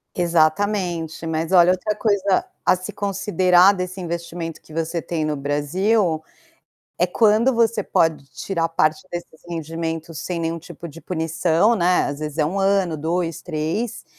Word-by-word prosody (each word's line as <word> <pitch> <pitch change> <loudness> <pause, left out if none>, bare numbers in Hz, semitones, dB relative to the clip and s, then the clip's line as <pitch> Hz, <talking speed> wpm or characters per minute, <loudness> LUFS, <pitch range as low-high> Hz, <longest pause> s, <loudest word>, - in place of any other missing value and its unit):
Exatamente. 170 0 0
Mas 160 +2 -2
olha, 180 -1 +7
outra 185 +3 -1
coisa 200 -3 +1 0.2
a - - +4
se 185 - -7
considerar 190 -2 +3
desse 185 0 -5
investimento 170 -1 -5
que - - -17
você 165 +1 -2
tem 165 -1 -3
no 155 -1 -1
Brasil, 160 +6 0 0.8
é 180 - +3
quando 220 +6 +3
você 230 -2 +2
pode 160 -6 +1
tirar 165 -4 -2
parte 155 +1 0
desses 175 -2 -8
rendimentos 165 -1 -4
sem 175 -2 -3
nenhum 165 0 -2
tipo 170 +1 -10
de 165 +2 -12
punição, 165 +5 +1
né. 180 0 +3
Às 140 0 -4
vezes 150 0 -5
é 155 - +3
1 180 +6 -2
ano, 195 -4 +2
2, 165 +2 -2
3, 170 +7 -3
170 Hz, 150 wpm, -22 LUFS, 160-190 Hz, 0.8 s, olha